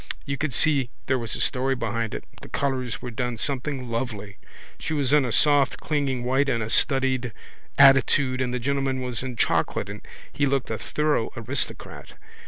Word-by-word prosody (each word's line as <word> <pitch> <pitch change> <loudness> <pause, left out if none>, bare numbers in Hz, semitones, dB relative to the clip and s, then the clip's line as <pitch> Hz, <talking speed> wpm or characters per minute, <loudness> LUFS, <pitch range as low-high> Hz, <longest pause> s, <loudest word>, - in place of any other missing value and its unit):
You 140 -1 -2
could 155 +1 -2
see 135 0 +3 0.2
there 130 -1 +1
was 115 -2 -2
a - - -4
story 135 0 +1
behind 115 -2 -3
it. - - -5 0.2
The - - -11
colours 130 -3 -2
were 125 - -5
done 120 0 -3
something 135 +1 -1
lovely. 110 -4 -4 0.4
She 155 - -3
was 140 -2 +2
in 150 -3 +5
a 125 - -2
soft 145 0 +3
clinging 140 -5 -1
white 135 +3 +1
in 115 - +1
a 110 -1 -3
studied 130 -2 +2 0.5
attitude 135 -1 +5
and 125 -1 -1
the 125 - -1
gentleman 135 0 -1
was 125 -2 -1
in 130 -1 -5
chocolate - - 0
and - - -9 0.3
he 145 - +1
looked 135 -3 -1
a 110 - -3
thorough 150 -6 0
aristocrat. 120 +4 -4
130 Hz, 185 wpm, -25 LUFS, 120-140 Hz, 0.5 s, in